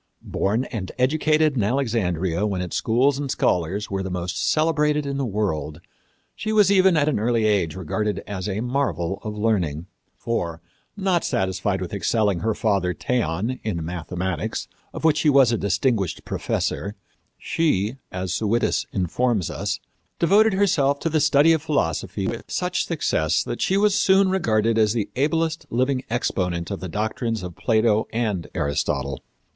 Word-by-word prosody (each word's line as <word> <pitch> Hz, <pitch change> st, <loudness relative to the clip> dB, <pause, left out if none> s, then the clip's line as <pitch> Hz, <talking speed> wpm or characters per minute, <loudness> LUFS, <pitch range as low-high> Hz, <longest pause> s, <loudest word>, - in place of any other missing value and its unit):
Born 110 Hz, +6 st, 0 dB
and 100 Hz, -6 st, -4 dB
educated 155 Hz, +3 st, +2 dB
in 120 Hz, -, +1 dB
Alexandria 100 Hz, -, 0 dB
when 100 Hz, -3 st, -2 dB
its 90 Hz, -1 st, -4 dB
schools 130 Hz, +5 st, +2 dB
and 140 Hz, -1 st, -3 dB
scholars 95 Hz, 0 st, 0 dB
were 95 Hz, 0 st, -1 dB
the 95 Hz, -, -4 dB
most 90 Hz, -2 st, -2 dB
celebrated 150 Hz, -2 st, +2 dB
in 140 Hz, -1 st, -3 dB
the 140 Hz, -, -1 dB
world, 80 Hz, -8 st, -2 dB, 0.6 s
she 215 Hz, -, -3 dB
was 210 Hz, -3 st, +5 dB
even 190 Hz, -3 st, +5 dB
at 145 Hz, -1 st, +2 dB
an 145 Hz, -8 st, +1 dB
early 115 Hz, 0 st, +1 dB
age 100 Hz, -7 st, +1 dB
regarded 105 Hz, +4 st, -2 dB
as 100 Hz, -1 st, -4 dB
a 100 Hz, +2 st, -2 dB
marvel 100 Hz, -, -1 dB
of 105 Hz, -1 st, -5 dB
learning. 90 Hz, -8 st, 0 dB, 0.3 s
For, 85 Hz, -8 st, -2 dB, 0.4 s
not 190 Hz, -3 st, +1 dB
satisfied 95 Hz, 0 st, -1 dB
with 90 Hz, -, -5 dB
excelling 100 Hz, 0 st, +1 dB
her 110 Hz, +2 st, 0 dB
father, 95 Hz, -5 st, 0 dB
Theon, 120 Hz, 0 st, -1 dB
in 85 Hz, -7 st, -3 dB
mathematics, 90 Hz, 0 st, -3 dB, 0.2 s
of -, -, -8 dB
which 160 Hz, -1 st, +4 dB
he 155 Hz, -, +3 dB
was 135 Hz, -4 st, +5 dB
a 115 Hz, -, +1 dB
distinguished 100 Hz, -1 st, 0 dB
professor, 100 Hz, +2 st, -2 dB, 0.4 s
she, 130 Hz, -, 0 dB
as 90 Hz, -1 st, -3 dB
Suidas 110 Hz, +3 st, 0 dB
informs 100 Hz, +2 st, 0 dB
us, -, -, -3 dB, 0.4 s
devoted 205 Hz, +5 st, +4 dB
herself 150 Hz, -8 st, +2 dB
to 165 Hz, -, 0 dB
the 155 Hz, -1 st, +2 dB
study 150 Hz, +2 st, +5 dB
of 160 Hz, -, 0 dB
philosophy 145 Hz, -, -1 dB
with -, -, -4 dB
such -, -, -1 dB
success 80 Hz, +1 st, +1 dB
that -, -, -5 dB
she 190 Hz, -, +2 dB
was 205 Hz, 0 st, +3 dB
soon 195 Hz, -2 st, +4 dB
regarded 115 Hz, -, +2 dB
as 105 Hz, -1 st, +3 dB
the 110 Hz, -4 st, -2 dB
ablest 160 Hz, +3 st, 0 dB
living 130 Hz, +2 st, 0 dB
exponent 90 Hz, -7 st, -1 dB
of 100 Hz, -, -3 dB
the 95 Hz, -, -6 dB
doctrines 110 Hz, +2 st, -2 dB
of 90 Hz, -2 st, -7 dB
Plato 110 Hz, -1 st, +2 dB
and 110 Hz, -6 st, -1 dB
Aristotle. 70 Hz, -1 st, -1 dB
110 Hz, 160 wpm, -23 LUFS, 95-140 Hz, 0.6 s, was